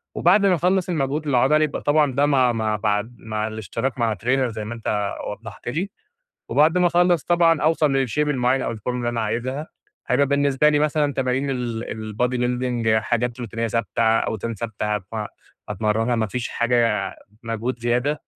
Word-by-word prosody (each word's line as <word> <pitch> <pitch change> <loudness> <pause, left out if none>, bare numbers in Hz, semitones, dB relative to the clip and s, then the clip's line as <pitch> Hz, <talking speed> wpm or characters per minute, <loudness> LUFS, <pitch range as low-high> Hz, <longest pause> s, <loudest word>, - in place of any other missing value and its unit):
وبعد 200 +4 +4
ما 185 -2 +4
أخلص 185 +2 +1
المجهود 150 -2 -1
العضلي 140 +3 +3
يبقى 150 - -2
طبعًا 145 -1 +3
ده 140 +3 +3
مع 130 -4 +3
مع 110 -2 -1
بعد 105 +3 -1
مع 110 -1 -3
الإشتراك 115 +4 -4
مع 115 -2 +1
trainer 130 +3 +1
زي 110 -1 -5
ما 115 - -5
أنتَ 105 -3 -2 0.2
وضحت 105 +1 -10
لي، 170 +10 -2 0.6
وبعد 155 +4 +3
ما 180 - +4
أخلص 175 -2 +3
طبعًا 170 -2 +3
أوصل 150 -4 +2
للshape 125 - -6
المعين 130 -2 +1
أو - - -2
الفورمة 125 +3 -4
اللي 120 -1 -1
أنا 120 -1 -1
عايزها 125 +7 -2 0.4
هيبقى 130 +2 +3
بالنسبة 140 +1 +3
لي 150 - +3
مثلًا 150 -1 +1
تمارين 135 +1 0
ال 120 -3 -3 0.3
الbody 125 +4 +1
building 125 -1 -1
حاجات 120 +1 -1
روتينية 115 0 -3
ثابتة 115 0 -1
أوزان 115 0 +1
ثابتة، 105 -1 -2 0.7
فأتمرنها 110 +4 0
ما 110 -1 +1
فيش 120 +4 -4
حاجة 120 -1 +1 0.3
مجهود 115 +2 -3
زيادة، 125 +5 0
125 Hz, 165 wpm, -22 LUFS, 115-145 Hz, 0.7 s, وبعد